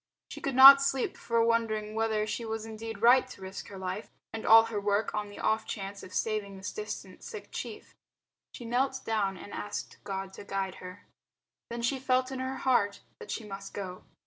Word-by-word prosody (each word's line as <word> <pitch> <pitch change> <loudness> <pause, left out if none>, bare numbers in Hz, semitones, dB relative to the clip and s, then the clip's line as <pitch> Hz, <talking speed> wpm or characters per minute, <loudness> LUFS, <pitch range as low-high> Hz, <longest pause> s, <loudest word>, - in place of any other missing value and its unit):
She - - -8
could 275 -2 -2
not 275 +1 +11
sleep 270 -2 0
for 230 -1 +1
wondering 220 -2 0
whether 220 -1 0
she 230 - -3
was 220 -1 -4
indeed 225 -1 -7
right 250 +2 +6
to 250 - -12
risk 190 +1 -7
her 200 - -9
life 190 +3 -5 0.2
and 225 - -5
all 225 0 +9
her 220 -3 -3
work 205 +1 0
on 210 -1 -2
the 205 - -12
off 220 +1 0
chance 200 0 -5
of 185 - -11
saving 200 0 -2
this 190 +1 -5
distant 425 -1 -7
sick 440 -3 -9
chief. - - -7 0.6
She 240 - -8
knelt 265 +3 0
down 200 -4 0
and 205 - -10
asked 205 - -6
God 195 -1 -5
to - - -9
guide 195 -1 -3
her. 185 +2 -10 0.6
Then 235 0 -5
she 265 +3 0
felt 255 0 +1
in 265 - -4
her 260 +1 -3
heart 205 -7 +1 0.2
that 450 - -10
she 230 - -3
must 195 -1 -8
go. 185 -2 -6
220 Hz, 200 wpm, -30 LUFS, 200-245 Hz, 0.6 s, not